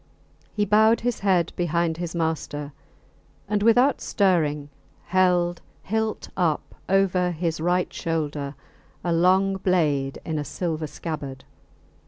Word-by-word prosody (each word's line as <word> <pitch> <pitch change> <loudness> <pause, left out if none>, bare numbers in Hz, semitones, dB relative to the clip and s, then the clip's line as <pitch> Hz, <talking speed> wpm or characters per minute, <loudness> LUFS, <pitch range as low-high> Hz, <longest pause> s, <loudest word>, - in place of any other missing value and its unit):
He 210 - +1
bowed 220 +3 +4
his 245 -1 -1
head 185 -4 +2
behind 170 -1 0
his 175 -1 -4
master, 150 -3 -2 0.7
and 205 0 0
without 245 +5 +4
stirring 155 -7 +1 0.4
held 175 -1 +2 0.2
hilt 220 +1 -2
up 170 -5 0 0.2
over 185 -2 +3
his 165 -2 -2
right 180 +2 +1
shoulder 150 -3 -3 0.5
a 175 - 0
long 190 +3 +3
blade 150 -8 +1
in 160 -2 -2
a - - -2
silver 160 0 -3
scabbard. 145 -4 -6
175 Hz, 120 wpm, -24 LUFS, 155-190 Hz, 0.7 s, bowed